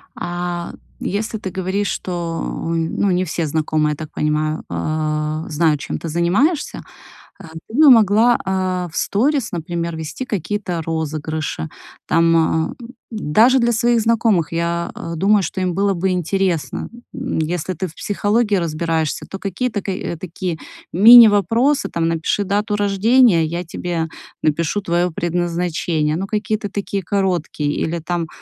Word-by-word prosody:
А 175 Hz, 0 st, -4 dB, 0.3 s
если 220 Hz, +3 st, -2 dB
ты 190 Hz, -, -5 dB
говоришь, 190 Hz, +2 st, -2 dB
что, 170 Hz, -2 st, -3 dB
ну, 165 Hz, -, -1 dB
не 180 Hz, 0 st, +1 dB
все 165 Hz, -1 st, -2 dB
знакомые, 155 Hz, 0 st, 0 dB
я -, -, -5 dB
так 155 Hz, +1 st, -8 dB
понимаю, 155 Hz, +1 st, -1 dB
э, 155 Hz, -, -2 dB
знают, 155 Hz, -1 st, +2 dB
чем -, -, -4 dB
ты 165 Hz, -, -6 dB
занимаешься, 200 Hz, -, +1 dB, 0.6 s
э, -, -, -13 dB, 0.2 s
ты 220 Hz, -, -11 dB
бы 300 Hz, 0 st, +7 dB
могла, 225 Hz, +1 st, +5 dB
э, 185 Hz, -2 st, -1 dB
в -, -, -11 dB
сторис, 260 Hz, +4 st, +1 dB
например, 170 Hz, 0 st, -3 dB
вести 160 Hz, +10 st, -5 dB
какие-то 200 Hz, -4 st, -3 dB
розыгрыши, 155 Hz, -, -3 dB, 0.4 s
там, 165 Hz, -1 st, +2 dB
э, -, -, -11 dB, 0.4 s
даже 225 Hz, -, +3 dB
для 240 Hz, -1 st, +2 dB
своих 235 Hz, +1 st, +2 dB
знакомых. 220 Hz, -8 st, +2 dB
Я, 170 Hz, 0 st, -1 dB
э, 165 Hz, -, -6 dB
думаю, 200 Hz, +4 st, +3 dB
что 185 Hz, +2 st, -3 dB
им 180 Hz, -2 st, 0 dB
было 200 Hz, +1 st, +2 dB
бы 190 Hz, +1 st, -1 dB
интересно, 180 Hz, -1 st, -1 dB, 0.3 s
м, -, -, -3 dB
если 175 Hz, +3 st, -2 dB
ты 185 Hz, +3 st, -3 dB
в 160 Hz, -, -15 dB
психологии 205 Hz, +2 st, 0 dB
разбираешься, 165 Hz, -2 st, -1 dB
то 195 Hz, -, -6 dB
какие-то 205 Hz, +3 st, -2 dB
ка, 195 Hz, -, -3 dB, 0.3 s
такие 175 Hz, -1 st, -4 dB, 0.4 s
мини-вопросы, 230 Hz, -, +6 dB
там: 165 Hz, -1 st, 0 dB
"Напиши 165 Hz, +5 st, 0 dB
дату 205 Hz, +2 st, 0 dB
рождения, 205 Hz, -1 st, +4 dB
я 170 Hz, +3 st, -3 dB
тебе 165 Hz, -1 st, -3 dB, 0.3 s
напишу 165 Hz, +6 st, 0 dB
твоё 175 Hz, -1 st, 0 dB
предназначение". 170 Hz, -2 st, -1 dB
Ну, 190 Hz, +3 st, -3 dB
какие-то 210 Hz, 0 st, -2 dB
такие 200 Hz, 0 st, -3 dB
короткие. 175 Hz, -6 st, -1 dB
Или 170 Hz, +2 st, -2 dB
там: 170 Hz, 0 st, -3 dB
175 Hz, 145 wpm, -19 LUFS, 160-205 Hz, 0.6 s, бы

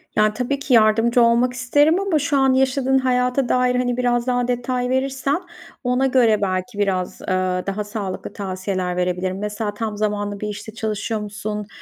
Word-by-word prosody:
Ya, 215 Hz, 0 st, +3 dB
tabii 250 Hz, +4 st, -2 dB
ki 280 Hz, -2 st, -1 dB
yardımcı 225 Hz, +2 st, +4 dB
olmak 235 Hz, +2 st, +3 dB
isterim 290 Hz, +7 st, +3 dB
ama 390 Hz, -6 st, +1 dB
şu 285 Hz, 0 st, 0 dB
an 270 Hz, -1 st, +4 dB
yaşadığın 265 Hz, 0 st, +2 dB
hayata 250 Hz, 0 st, +1 dB
dair, 250 Hz, 0 st, +2 dB
hani, 245 Hz, -1 st, 0 dB
biraz 245 Hz, -1 st, +1 dB
daha 245 Hz, -1 st, +1 dB
detay 250 Hz, 0 st, -1 dB
verirsen 270 Hz, +4 st, 0 dB, 0.4 s
ona 250 Hz, +1 st, +1 dB
göre 235 Hz, -5 st, +3 dB
belki 190 Hz, +3 st, -2 dB
biraz, 185 Hz, -3 st, -1 dB
aaa, 185 Hz, -1 st, -1 dB
daha 200 Hz, +2 st, -2 dB
sağlıklı 205 Hz, -2 st, -5 dB
tavsiyeler 185 Hz, -2 st, -3 dB
verebilirim. 180 Hz, +1 st, -1 dB
Mesela, 210 Hz, 0 st, -3 dB
tam 210 Hz, 0 st, -4 dB
zamanlı 205 Hz, -1 st, -2 dB
bir 210 Hz, -, -3 dB
işte 210 Hz, +1 st, -7 dB
çalışıyor 220 Hz, 0 st, -3 dB
musun? 210 Hz, 0 st, -5 dB
230 Hz, 170 wpm, -21 LUFS, 205-255 Hz, 0.4 s, yardımcı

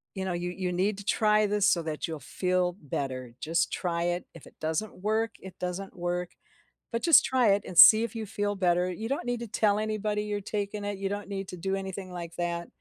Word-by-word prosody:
"You 190 Hz, -, -3 dB
know, 185 Hz, -, -1 dB
you 175 Hz, +1 st, -3 dB
you 180 Hz, 0 st, -3 dB
need 195 Hz, +3 st, 0 dB
to -, -, -8 dB
try 215 Hz, 0 st, +3 dB
this 205 Hz, 0 st, +3 dB
so 170 Hz, -, +2 dB
that 155 Hz, 0 st, -3 dB
you'll 160 Hz, -2 st, -5 dB
feel 180 Hz, -1 st, 0 dB
better. 130 Hz, -4 st, -4 dB
Just 165 Hz, +2 st, 0 dB
try 170 Hz, -2 st, -1 dB
it. 175 Hz, 0 st, -1 dB
If 165 Hz, -, -13 dB
it -, -, -17 dB
doesn't 160 Hz, +6 st, -3 dB
work, 220 Hz, +1 st, +1 dB
it 190 Hz, -1 st, -10 dB
doesn't 180 Hz, +2 st, -5 dB
work. 175 Hz, 0 st, -2 dB, 0.6 s
But 230 Hz, -, -2 dB
just 335 Hz, -3 st, +7 dB
try 255 Hz, -4 st, +3 dB
it 200 Hz, -, 0 dB
and 175 Hz, -, -7 dB
see 220 Hz, +4 st, +10 dB
if 235 Hz, -, -4 dB
you 225 Hz, -1 st, -3 dB
feel 205 Hz, 0 st, -2 dB
better. 180 Hz, -1 st, +2 dB
You 220 Hz, +6 st, -5 dB
don't 275 Hz, -3 st, -2 dB
need 245 Hz, -1 st, -1 dB
to 235 Hz, -, -5 dB
tell 210 Hz, -1 st, +2 dB
anybody 215 Hz, -1 st, -1 dB
you're 205 Hz, -1 st, -3 dB
taking 205 Hz, 0 st, -3 dB
it. 205 Hz, -1 st, -3 dB
You 195 Hz, 0 st, -2 dB
don't 205 Hz, 0 st, -5 dB
need 195 Hz, -1 st, -4 dB
to 180 Hz, -, -7 dB
do 190 Hz, +3 st, -2 dB
anything 190 Hz, -1 st, -6 dB
like 170 Hz, -1 st, -7 dB
that, 170 Hz, 0 st, -2 dB
190 Hz, 235 wpm, -28 LUFS, 175-210 Hz, 0.6 s, see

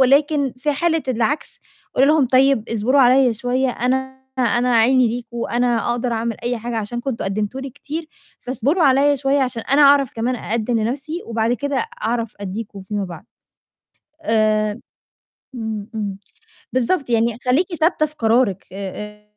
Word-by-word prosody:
ولكن 280 Hz, +1 st, +3 dB
في 295 Hz, +3 st, 0 dB
حالة 325 Hz, +2 st, +1 dB
العكس 245 Hz, +4 st, -1 dB, 0.4 s
قولي 270 Hz, -, +4 dB
لهم 305 Hz, -4 st, +4 dB
طيب 260 Hz, -2 st, +3 dB
اصبروا 230 Hz, +5 st, +2 dB
عليّا 255 Hz, -1 st, +5 dB
شوية، 250 Hz, +3 st, 0 dB
أنا 265 Hz, +2 st, -2 dB, 0.2 s
أنا 245 Hz, 0 st, +2 dB
عيني 250 Hz, +1 st, +4 dB
ليكم 235 Hz, 0 st, -6 dB
وأنا 240 Hz, 0 st, 0 dB
أقدر 240 Hz, 0 st, -1 dB
أعمل 230 Hz, 0 st, -2 dB
أي 240 Hz, -1 st, -1 dB
حاجة 235 Hz, +1 st, -4 dB
عشان 230 Hz, +3 st, -4 dB
كنتم 255 Hz, -2 st, -3 dB
قدّمتوا 210 Hz, +6 st, -2 dB
لي 270 Hz, 0 st, -6 dB
كتير 310 Hz, +4 st, -6 dB, 0.3 s
فاصبروا 275 Hz, +7 st, 0 dB
عليّا 280 Hz, +2 st, +4 dB
شوية 275 Hz, +1 st, +1 dB
عشان 250 Hz, -3 st, -2 dB
أنا 280 Hz, +2 st, +3 dB
أعرف 280 Hz, -2 st, +5 dB
كمان 240 Hz, +3 st, -1 dB
أقدّم 230 Hz, 0 st, -1 dB
لنَفْسي 285 Hz, +9 st, -3 dB
وبعد 230 Hz, 0 st, 0 dB
كده 280 Hz, -2 st, -2 dB, 0.2 s
أعرف 230 Hz, -1 st, -1 dB
أدّيكم 200 Hz, 0 st, -6 dB
فيما 205 Hz, +1 st, -3 dB
بعد. 175 Hz, +1 st, -9 dB, 1.0 s
آآ، 215 Hz, -3 st, +1 dB, 0.8 s
إمم، 220 Hz, -2 st, -5 dB
إمم، 200 Hz, -2 st, -3 dB, 0.5 s
بالضبط. 255 Hz, +2 st, 0 dB
يعني 230 Hz, 0 st, +1 dB
خلّيكِ 340 Hz, +8 st, +2 dB
ثابتة 315 Hz, -1 st, +2 dB
في 300 Hz, -, -17 dB
قرارِك 225 Hz, -4 st, +1 dB
آآ، 210 Hz, +2 st, -7 dB
245 Hz, 150 wpm, -20 LUFS, 225-270 Hz, 1.0 s, عليّا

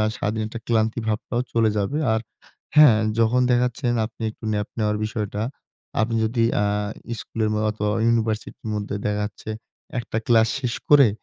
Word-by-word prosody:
আ -, -, +3 dB
সারাদিন 110 Hz, -1 st, -1 dB
একটা 115 Hz, +1 st, -7 dB
ক্লান্তি 110 Hz, 0 st, +1 dB
ভাবটাও 110 Hz, +2 st, -1 dB
চলে 115 Hz, -1 st, +3 dB
যাবে। 105 Hz, +9 st, 0 dB
আর 110 Hz, -, +1 dB, 0.6 s
হ্যাঁ, 145 Hz, -8 st, +8 dB, 0.2 s
যখন 115 Hz, +2 st, +3 dB
দেখা 125 Hz, 0 st, +4 dB
যাচ্ছে 125 Hz, +2 st, -6 dB
না -, -, +1 dB
আপনি 115 Hz, -, -12 dB
একটু 110 Hz, -, -14 dB
ন্যাপ 105 Hz, -1 st, -1 dB
নেওয়ার 105 Hz, -1 st, +1 dB
বিষয়টা। 105 Hz, -2 st, -3 dB, 0.6 s
আপনি 115 Hz, +1 st, +1 dB
যদি 115 Hz, +1 st, +1 dB, 0.2 s
আ -, -, +2 dB, 0.5 s
স্কুলের 110 Hz, -1 st, -2 dB, 0.2 s
অথবা 105 Hz, 0 st, -1 dB, 0.2 s
ইউনিভার্সিটির 115 Hz, -1 st, -1 dB
মধ্যে 105 Hz, -1 st, -3 dB
দেখা 105 Hz, 0 st, 0 dB
যাচ্ছে 105 Hz, +1 st, -7 dB, 0.5 s
একটা 115 Hz, -, -4 dB
ক্লাস 115 Hz, -3 st, +5 dB
শেষ 125 Hz, -2 st, -1 dB, 0.2 s
করে 140 Hz, -4 st, +8 dB
110 Hz, 165 wpm, -23 LUFS, 105-120 Hz, 0.6 s, হ্যাঁ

